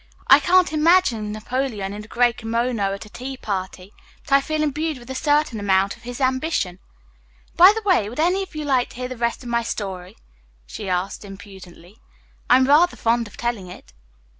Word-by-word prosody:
"I - - +9
can't 365 -2 +3
imagine 305 - +2
Napoleon 215 -2 -3
in 210 +1 -7
a - - -14
gray 240 +1 +2
kimono 230 +1 -2
at 200 +2 -6
a - - -14
tea 260 +4 -7
party, 190 -2 -5 0.3
but 290 - -15
I 275 0 +6
feel 310 +2 -2
imbued 305 +1 -2
with 245 +1 -11
a - - -3
certain 290 -3 +1
amount 195 -1 +1
of - - -22
his 245 +2 -8
ambition. 260 - -1 0.8
By 365 +3 +8
the 445 - -4
way, 285 - +3
would 245 - -8
any 360 +4 +2
of 380 -4 -8
you 305 -1 -4
like 260 -3 +1
to - - -15
hear 250 +1 -4
the 255 - -7
rest 235 +2 -2
of 245 - -8
my 235 0 +1
story?" 195 -3 -6 0.5
she 200 - -7
asked 180 +3 -2
impudently. 195 -1 -13 0.5
"I'm 260 +1 +6
rather 310 +6 +4
fond 230 0 0
of - - -15
telling 235 -6 -3
it." - - -13
240 Hz, 195 wpm, -22 LUFS, 205-290 Hz, 0.8 s, I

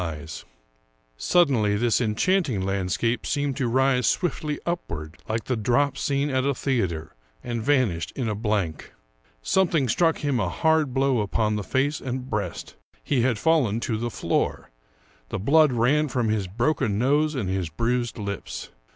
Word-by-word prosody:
io8 90 - -1
Ambrose 75 - -8
Bierce 80 +1 -9 0.7
Suddenly 125 - +3
this 120 +3 +2
enchanting 125 - +1
landscape 100 +5 -1
seemed 145 -2 -1
to 130 - 0
rise 130 0 +2
swiftly 155 +2 -1
upward, 80 - -4
like 110 +1 -1
the 130 - -1
drop 125 +6 +1
scene 140 +1 0
at 130 0 +1
a 140 0 +1
theater, 95 - -2 0.3
and 120 -2 -3
vanished 110 - +1
in 125 -4 -2
a 110 - 0
blank. 105 -7 -2 0.5
Something 170 - +2
struck 165 +7 +2
him 140 -4 +1
a 95 -5 0
hard 160 - +2
blow 135 -2 +2
upon 105 +1 0
the 105 - -2
face 140 +7 0
and 130 0 -5
breast. 100 -5 -3 0.3
He 135 -4 +1
had 120 -2 +1
fallen 135 -9 +2
to 115 - -1
the 120 +2 -2
floor; - - -2 0.6
the - - -3
blood 145 +8 +4
ran 130 +6 +2
from 125 -4 -1
his 105 -3 0
broken 120 +1 0
nose 145 +6 +2
and 115 -8 -2
his 95 -3 -2
bruised 120 +8 -1
lips. 100 -2 -5
120 Hz, 165 wpm, -25 LUFS, 105-140 Hz, 0.7 s, blood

